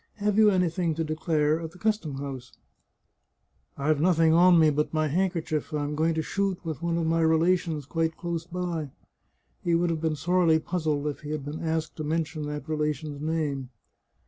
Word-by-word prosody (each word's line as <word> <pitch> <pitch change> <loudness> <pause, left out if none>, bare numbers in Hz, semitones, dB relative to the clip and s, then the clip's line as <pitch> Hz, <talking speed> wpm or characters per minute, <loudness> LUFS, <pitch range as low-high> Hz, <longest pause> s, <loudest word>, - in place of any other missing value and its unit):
Have 210 0 +1
you 215 -1 +7
anything 180 -3 +1
to 165 - -1
declare 155 -1 +1
at 165 0 -6
the - - -14
custom 210 -9 -1
house? 135 -3 -7 0.4
" - - -50
" - - -48 0.3
I've 145 +1 +1
nothing 165 -2 +4
on 175 +1 +6
me 155 -2 +5
but 150 +1 0
my 155 0 +2
handkerchief; 165 -2 -1
I 150 - -1
am 145 +1 -3
going 160 +2 +1
to 160 - -1
shoot 195 +2 -1
with 160 -1 -4
one 170 0 0
of 165 - 0
my 165 +1 +2
relations, 160 -1 +2
quite 165 +2 -1
close 170 -1 -4
by." 175 -4 -3 0.7
He 170 -1 +2
would 170 0 +2
have 160 -2 -2
been 160 -1 0
sorely 170 +1 +3
puzzled 155 -3 -1
if 150 -1 -3
he 150 - -9
had 150 -2 -3
been 150 +3 -5
asked 160 -1 -2
to 155 - -3
mention 155 -1 -2
that 150 0 -5
relation's 150 -1 -2
name. 150 -5 -2
160 Hz, 200 wpm, -27 LUFS, 150-170 Hz, 0.7 s, you